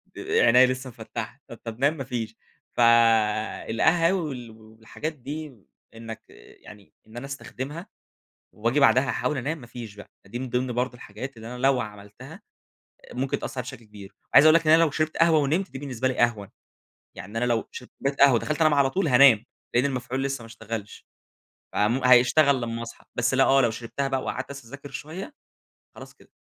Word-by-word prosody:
د -, -, -9 dB
عينيا 125 Hz, +2 st, +5 dB
لسه 130 Hz, +1 st, -3 dB
مفَتحة 120 Hz, -, -7 dB
طب -, -, -10 dB
طب 115 Hz, 0 st, -7 dB
نام 145 Hz, +4 st, +2 dB
ما 135 Hz, -, -4 dB
فيش، 120 Hz, -4 st, -5 dB, 0.4 s
فالقهاوي 115 Hz, -, +3 dB
وال 130 Hz, -8 st, -6 dB
والحاجات 110 Hz, +7 st, -8 dB
دي 150 Hz, +2 st, -7 dB, 0.4 s
إنك 115 Hz, 0 st, -8 dB, 0.4 s
يعني 100 Hz, -2 st, -15 dB
إن 110 Hz, +2 st, -12 dB
أنا 120 Hz, -, -6 dB
أستخدمها 140 Hz, +4 st, -7 dB, 0.6 s
وآجي 115 Hz, +7 st, 0 dB
بعدها 130 Hz, 0 st, +4 dB
أحاول 125 Hz, +4 st, -1 dB
أنام 145 Hz, +6 st, -2 dB
ما 120 Hz, -, -12 dB
فيش 115 Hz, -4 st, -9 dB
بقى 105 Hz, -, -12 dB, 0.2 s
فدي 105 Hz, +5 st, -6 dB
من 130 Hz, 0 st, -5 dB
ضمن 125 Hz, +1 st, -1 dB
برضه 125 Hz, +2 st, -1 dB
الحاجات 120 Hz, +2 st, -9 dB
اللي 110 Hz, 0 st, -9 dB
أنا -, -, -7 dB
لو 130 Hz, 0 st, +2 dB
عملتها 105 Hz, -1 st, -10 dB, 0.7 s
ممكن 130 Hz, +2 st, -2 dB
تأثر 130 Hz, -, -5 dB
عليَّ -, -, -2 dB
بشكل 130 Hz, -3 st, -10 dB
كبير، 105 Hz, -2 st, -13 dB, 0.2 s
عايز 145 Hz, -, +8 dB
أقول 155 Hz, +1 st, +7 dB
لك 165 Hz, -1 st, +2 dB
إن 155 Hz, -, +7 dB
أنا 165 Hz, +1 st, +6 dB
لو 160 Hz, -, +1 dB
شربت 155 Hz, +1 st, -2 dB
قهوة 165 Hz, -1 st, +4 dB
ونمت 160 Hz, +7 st, 0 dB
دي 135 Hz, -, -7 dB
بالنسبة 130 Hz, -3 st, -2 dB
لي 130 Hz, -, -3 dB
أهون. 110 Hz, -4 st, 0 dB, 0.7 s
يعني 105 Hz, +5 st, -8 dB
أنا 120 Hz, -, +1 dB
لو 120 Hz, -2 st, 0 dB
شربت 125 Hz, -, -10 dB
كوباية 140 Hz, +1 st, -1 dB
قهوة 140 Hz, -1 st, +6 dB
ودخلت 150 Hz, +7 st, -1 dB
أنام 155 Hz, -1 st, +5 dB
على 140 Hz, -2 st, +3 dB
طول 190 Hz, +5 st, -1 dB
هانام، 125 Hz, -4 st, +6 dB, 0.3 s
لأن 120 Hz, +3 st, +3 dB
المفعول 130 Hz, -1 st, -2 dB
لسه 135 Hz, -2 st, -3 dB
ما -, -, -10 dB
اشتغلش، 115 Hz, -2 st, -8 dB, 0.7 s
فم 115 Hz, +6 st, +1 dB
هيشتغل 130 Hz, +3 st, +5 dB
لما 115 Hz, -1 st, -4 dB
أصحى، 115 Hz, 0 st, -10 dB
بس 120 Hz, +2 st, 0 dB
لأ 135 Hz, 0 st, +5 dB
آه 135 Hz, 0 st, +4 dB
لو 120 Hz, -3 st, +3 dB
شربتها 120 Hz, +5 st, -4 dB
بقى 135 Hz, -1 st, -1 dB
وقعدت -, -, -4 dB
أسهر 140 Hz, -4 st, -10 dB
أذاكر 140 Hz, +2 st, -10 dB
شوية 180 Hz, -, -7 dB, 0.6 s
خلاص -, -, -12 dB
كده. -, -, -23 dB
125 Hz, 190 wpm, -25 LUFS, 115-140 Hz, 0.7 s, عايز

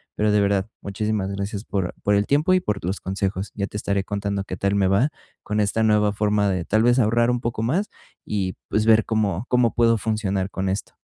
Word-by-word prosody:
pero, 105 Hz, 0 st, +1 dB
de 105 Hz, -, +3 dB
verdad, 100 Hz, 0 st, +1 dB
muchísimas 100 Hz, 0 st, -2 dB
gracias 100 Hz, +2 st, -4 dB
por 95 Hz, -3 st, -2 dB
por 105 Hz, -, +2 dB
el 100 Hz, 0 st, +1 dB
tiempo 150 Hz, +6 st, +3 dB
y 185 Hz, -, +5 dB
por 105 Hz, -, -2 dB
tus 95 Hz, +2 st, -4 dB
consejos. 95 Hz, 0 st, -3 dB
Ya 100 Hz, -, -1 dB
te 105 Hz, -, -7 dB
estaré 100 Hz, -1 st, -1 dB
contando 100 Hz, -1 st, -2 dB
qué 95 Hz, -, -5 dB
tal 100 Hz, +3 st, 0 dB
me 100 Hz, -1 st, +2 dB
va 100 Hz, +10 st, +3 dB, 0.3 s
con 105 Hz, 0 st, -2 dB
esta 105 Hz, +2 st, +1 dB
nueva 105 Hz, -1 st, +3 dB
forma 105 Hz, 0 st, +1 dB
de, 90 Hz, -3 st, -1 dB
tal 110 Hz, +2 st, +2 dB
vez, 120 Hz, +2 st, +4 dB
ahorrar 115 Hz, +1 st, +3 dB
un 125 Hz, -1 st, -1 dB
poco 115 Hz, -2 st, -2 dB
más 170 Hz, -, 0 dB, 0.4 s
y, 95 Hz, -3 st, -2 dB, 0.2 s
pues, 105 Hz, 0 st, +1 dB
ver 110 Hz, 0 st, +5 dB
cómo 105 Hz, -2 st, -1 dB
cómo 125 Hz, -2 st, +3 dB
puedo 115 Hz, -1 st, +3 dB
funcionar 100 Hz, -3 st, -1 dB
con 95 Hz, 0 st, -2 dB
esto. 95 Hz, +2 st, -3 dB
105 Hz, 220 wpm, -23 LUFS, 100-110 Hz, 0.4 s, y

